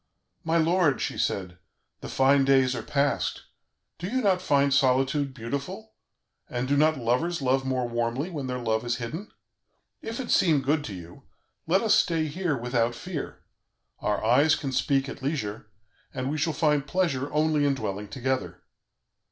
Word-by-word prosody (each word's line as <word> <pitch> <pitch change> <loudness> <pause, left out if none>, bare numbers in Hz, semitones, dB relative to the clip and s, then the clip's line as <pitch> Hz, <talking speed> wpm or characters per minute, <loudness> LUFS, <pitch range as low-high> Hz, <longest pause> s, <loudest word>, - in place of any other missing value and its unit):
'My 165 +1 +1
lord,' 165 -4 +3
she - - -2
said, 90 -2 -2 0.4
'the - - -8
fine 135 +1 +4
days 135 -1 +4
are 120 - -3
past; 140 +2 -1 0.6
do 175 - -4
you 255 +6 0
not 190 -3 +3
find 140 -5 +2
solitude 135 +1 +2
beautiful, 140 - -6 0.6
and 125 +1 -2
do 145 - +2
not 155 +2 +3
lovers 130 +8 0
love 135 0 +1
more 130 -2 -1
warmly 120 +7 -2
when 145 -6 -4
their 125 0 -2
love 110 -2 -1
is 120 0 -1
hidden? 155 - -6 0.7
If 225 +2 -5
it 255 - -3
seem 155 -6 +4
good 145 +2 +1
to 100 - -6
you, 85 -1 -12 0.4
let 185 +4 +3
us 220 -2 +4
stay 165 -6 +2
here 160 -1 -1
without 120 -1 0
fear; 170 +1 -6 0.6
our 105 +1 -1
eyes 140 +7 +5
can 135 -3 -4
speak 135 +1 +1
at - - -8
leisure, 110 -7 -3 0.5
and 130 +1 -2
we 155 - -2
shall 160 +3 +1
find 150 -2 +1
pleasure 145 -6 0
only 150 0 +2
in 140 -1 +2
dwelling 100 -4 -4
together. 130 +2 -3
140 Hz, 170 wpm, -26 LUFS, 125-160 Hz, 0.7 s, eyes